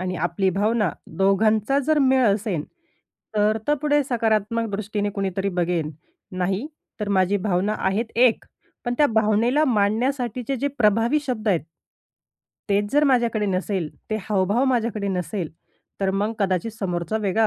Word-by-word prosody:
आणि 185 0 -3
आपली 190 +2 0
भावना 210 +1 +1 0.3
दोघांचा 215 +6 +3
जर 310 -1 +3
मेळ 260 -2 +4
असेन, 200 -5 0 0.7
तर 210 +1 +3
त - - +4
पुढे 295 -1 +3
सकारात्मक 230 -2 0
दृष्टीने 205 0 -2
कुणीतरी 195 -1 -2
बघेन. 175 -4 -1 0.5
नाहीतर 210 - -4
माझी 195 0 +2
भावना 195 +1 0
आहे 195 +4 +1 0.2
एक, 230 - 0 0.4
पण 240 -1 -1
त्या 295 - +6
भावनेला 225 +5 +2
मांडण्यासाठीचे 245 +2 0
जे 280 +3 -1
प्रभावी 225 +5 +3
शब्द 230 -4 -2
आहेत. 180 -5 +3 1.1
तेच 200 0 +2
जर 295 +1 +4
माझ्याकडे 235 -6 +2
नसेल, 185 -3 -1 0.2
ते 215 - +1
हावभाव 205 +5 +1
माझ्याकडे 230 -5 0
नसेल, 180 -2 -3 0.5
तर 195 -1 +1
मग 205 +3 0
कदाचित 190 +1 0
समोरचा 185 -2 -2
वेगळा 215 +1 +2
210 Hz, 135 wpm, -23 LUFS, 195-235 Hz, 1.1 s, त्या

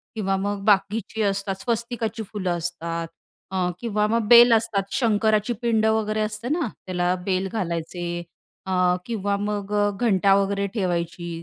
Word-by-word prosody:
किंवा 195 -3 0
मग 200 0 -3
बाकीची 205 +2 +1
असतात, 195 -1 -1
स्वस्तिकाची 235 -1 -2
फुलं 190 -3 -3
असतात 170 0 -4 0.4
अ, 185 -1 0
किंवा 210 -2 0
मग 225 0 0
बेल 240 0 +8
असतात, 225 -3 +1
शंकराची 220 -1 +2
पिंड 225 -2 +2
वगैरे 215 -1 +1
असते 215 +3 -3
ना 315 -2 0 0.2
त्याला 180 0 0
बेल 190 0 0
घालायचे 175 -2 -3 0.4
अ, 190 - -4 0.3
किंवा 205 -3 -1
मग 205 0 -3
अ, 205 0 +3
घंटा 200 -4 +3
वगैरे 200 0 +1
ठेवायची. 175 -4 -2
205 Hz, 140 wpm, -24 LUFS, 185-220 Hz, 0.4 s, बेल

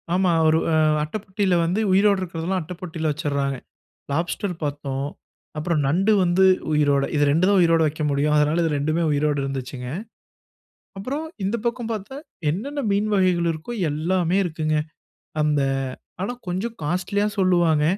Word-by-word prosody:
ஆமா. 185 -1 +3 0.2
ஒரு 160 +1 +4 0.4
அட்ட 150 - -6
பொட்டியில 190 -2 0
வந்து 180 +5 0
உயிரோட 200 +1 +4
இருக்கிறதெல்லாம் 180 +1 -2
அட்ட 165 +3 -7
பொட்டியில 160 -3 -3
வச்சுட்ராக. 140 -2 -1 0.6
லாப்ஸ்டர் 175 +5 -1
பார்த்தோம். 140 -1 -3 0.5
அப்புறம் 155 +1 0
நண்டு 185 +10 +2
வந்து 180 +1 +3 0.3
உயிரோட 145 -2 +3
இது 145 - +3
2 165 +5 +3
தான் 200 -1 +4
உயிரோட 165 -1 +4
வக்க 155 +1 -5
முடியும். 145 +2 +1
அதனால 150 +3 +2
இது 165 - +1
2 155 +4 0
உயிரோட 145 0 +1
இருந்துச்சுங்க. 130 -2 -5 1.1
அப்புறம் 265 +11 -4 0.2
இந்த 200 +5 0
பக்கம் 235 -1 -2
பார்த்தா, 215 +5 -6 0.3
என்னென்ன 275 - -3
மீன் 205 +2 +1
வகைகள் 180 -3 +2
இருக்கோ 155 +9 -7 0.2
எல்லாமே 175 +4 +1
இருக்குங்க. 155 -2 -1 0.7
அந்த 150 -1 +2 0.6
ஆனா, 200 +6 -2
கொஞ்சம் 190 +6 -2
காஸ்ட்லியா 185 +6 0
சொல்லுவாங்க. 175 -5 +3
170 Hz, 140 wpm, -23 LUFS, 150-190 Hz, 1.1 s, ஒரு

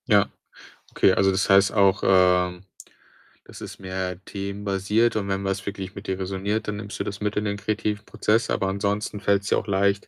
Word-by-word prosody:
Ja, 105 -4 +4 0.6
okay. 95 - +4
Also, 95 +1 +3
das 95 0 0
heißt 95 0 +5
auch, 100 -2 +3
ähm, 90 -1 +3 0.8
das - - -12
ist - - -8
mehr 95 -1 -4
themenbasiert 100 +3 -1
und 105 -2 -1
wenn 100 0 -2
was 95 -1 -2
wirklich 95 -1 -6
mit 100 +2 -9
dir 95 0 -2
resoniert, 100 +3 -2
dann 105 - -2
nimmst 105 -1 -7
du - - 0
das 100 -1 -5
mit 105 0 -1
in 105 - -1
den 100 0 -2
kreativen 105 0 -2
Prozess, 110 +2 +1
aber 100 - 0
ansonsten 100 +2 -2
fällt's 100 0 +1
dir - - +3
auch - - -3
leicht, 100 0 +1
100 Hz, 195 wpm, -24 LUFS, 95-105 Hz, 0.8 s, heißt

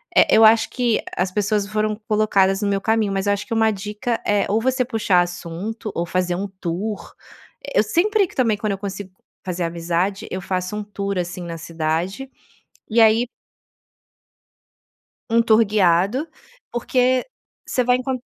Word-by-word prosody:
eh, - - +6
eu 225 - +8
acho 220 +1 +5
que 240 -3 0 0.2
as 185 +1 0
pessoas 210 0 0
foram 215 0 -1
colocadas 200 -2 +2
no 205 - 0
meu 200 0 +1
caminho, 220 -1 +1
mas 195 0 -1
eu 205 - +4
acho 205 - -4
que 230 - -3
uma 225 -1 +3
dica 210 +4 -3
é: 205 -1 +2
ou 220 +2 +1
você 255 +1 +1
puxar 210 -7 +2
assunto 180 +5 -5
ou 170 - -1
fazer 180 0 -1
um 195 +3 -3
tour. 195 +5 -4 0.5
E - - -3
eu - - +5
sempre 415 +1 +2
que, - - -17
também, 230 -5 +2
quando 205 0 -1
eu 195 - -4
consigo 195 -1 -6 0.3
fazer 180 -1 -3
amizade, 170 +3 -2
eu 185 - -3
faço 185 +2 -3
um 210 - -3
tour, 200 -1 -4
assim, 180 +1 -3
na 170 -1 -6
cidade, 165 +10 -3 0.6
e 230 +1 +2
aí 225 +2 +5 2.0
Um 230 +1 +4
tour 225 0 +5
guiado, 200 - +2 0.5
porque 250 +1 +1 0.4
você 250 - +1
vai 250 +1 +3
encon 255 0 -2
205 Hz, 170 wpm, -21 LUFS, 185-225 Hz, 2.0 s, eu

